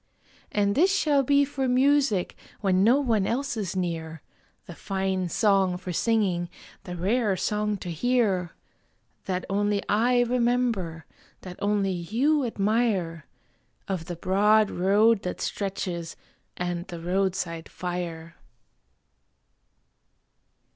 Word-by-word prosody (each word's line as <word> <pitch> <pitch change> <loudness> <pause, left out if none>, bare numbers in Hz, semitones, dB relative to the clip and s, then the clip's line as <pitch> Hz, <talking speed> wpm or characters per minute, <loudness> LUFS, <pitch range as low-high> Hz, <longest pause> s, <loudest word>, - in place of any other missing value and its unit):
And 200 -1 +1
this 355 - +4
shall 300 -8 +3
be 280 +2 +3
for 270 -1 -2
music 260 -6 +2 0.2
when 190 -2 +2
no 240 +6 +5
one 225 -8 +1
else 270 +2 -1
is 195 -4 -3
near 165 -3 -3 0.4
The 175 - -9
fine 190 0 -2
song 195 -2 +2
for 180 0 -6
singing, 185 -4 +1 0.4
the 180 - -6
rare 200 +3 +1
song 210 +2 -1
to 180 -2 -6
hear! 195 -2 0 0.7
That 185 -1 -2
only 205 +1 0
I 245 +4 +3
remember, 235 -9 0 0.4
that 180 -1 -9
only 200 -1 +1
you 235 - +1
admire, 200 -8 0 0.6
Of 185 -4 -3
the 175 0 -5
broad 205 +4 +3
road 205 +4 +3
that 180 - -5
stretches 180 -4 -4 0.4
and 175 0 -3
the 175 -3 -7
roadside 175 -2 -2
fire. 170 -2 -5
195 Hz, 115 wpm, -26 LUFS, 180-230 Hz, 0.7 s, no